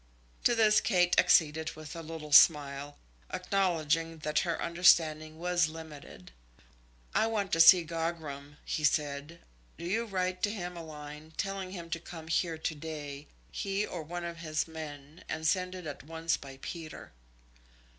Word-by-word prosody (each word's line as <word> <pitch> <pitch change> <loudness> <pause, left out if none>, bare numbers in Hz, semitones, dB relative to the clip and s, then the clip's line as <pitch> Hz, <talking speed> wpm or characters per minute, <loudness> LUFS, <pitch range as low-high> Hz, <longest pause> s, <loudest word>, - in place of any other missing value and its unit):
To 240 - +5
this 215 -2 +5
Kate 180 -4 +2
acceded 160 0 +3
with 155 -1 -9
a 165 - -5
little 160 -2 -8
smile, 145 -2 +5 0.3
acknowledging 165 -4 0
that 150 0 +2
her 170 -3 -1
understanding 160 -2 +3
was 175 0 +2
limited. 155 - -10 0.8
"I 220 - +3
want 210 -4 -1
to 165 - +1
see 170 +1 +9
Gogram," 160 -3 -5
he 155 - -2
said. 145 +2 0 0.4
"Do 170 - -7
you 220 +7 0
write 185 -3 -2
to 205 - +2
him 180 -4 -5
a 170 - -6
line, 150 0 -10
telling 195 -1 -3
him 170 -3 -8
to 165 - -1
come 165 -1 -10
here 165 0 0
to 160 - -2
day, 150 -2 -7 0.2
he 200 - -1
or 175 - -6
one 175 +3 -6
of 170 0 -6
his 155 -2 -2
men, 150 -1 -9
and 160 - -3
send 185 +2 +1
it 180 -2 -8
at 145 -2 -6
once 165 +2 -1
by 135 -1 -10
Peter." 165 -3 -7
165 Hz, 160 wpm, -31 LUFS, 155-180 Hz, 0.8 s, see